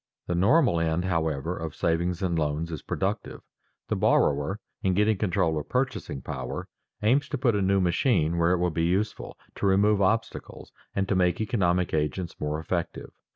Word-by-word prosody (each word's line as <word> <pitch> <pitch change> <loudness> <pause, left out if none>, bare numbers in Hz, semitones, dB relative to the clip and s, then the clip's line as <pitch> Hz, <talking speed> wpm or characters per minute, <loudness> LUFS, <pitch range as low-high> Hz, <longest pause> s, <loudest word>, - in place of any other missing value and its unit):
The - - -2
"normal" 110 - +3
end, 80 +2 0
however, 80 -2 -1
of 80 -3 -6
savings 85 +2 0
and 90 -2 0
loans 80 +1 -1
is 80 - -5
productive. 100 +2 -3 0.5
The - - 0
borrower, 75 +8 +2 0.2
in 95 -1 +1
getting 105 +2 +3
control 85 -5 0
of 75 - -9
purchasing 125 - -2
power, - - -5 0.4
aims 135 +6 +2
to 145 - -2
put 120 -2 +2
a 100 - +1
new 95 +1 +2
machine 85 - +1
where 85 +1 +3
it - - +2
will 90 0 0
be 80 +1 0
useful, 100 +5 -2 0.2
to - - -1
remove 100 +2 +3
obstacles, 110 +4 -2 0.2
and 100 -1 0
to - - +1
make 90 -2 +2
economic 90 -5 +1
agents 80 +3 -2
more 75 +1 -2
effective. 85 +1 -4
90 Hz, 175 wpm, -26 LUFS, 80-100 Hz, 0.5 s, normal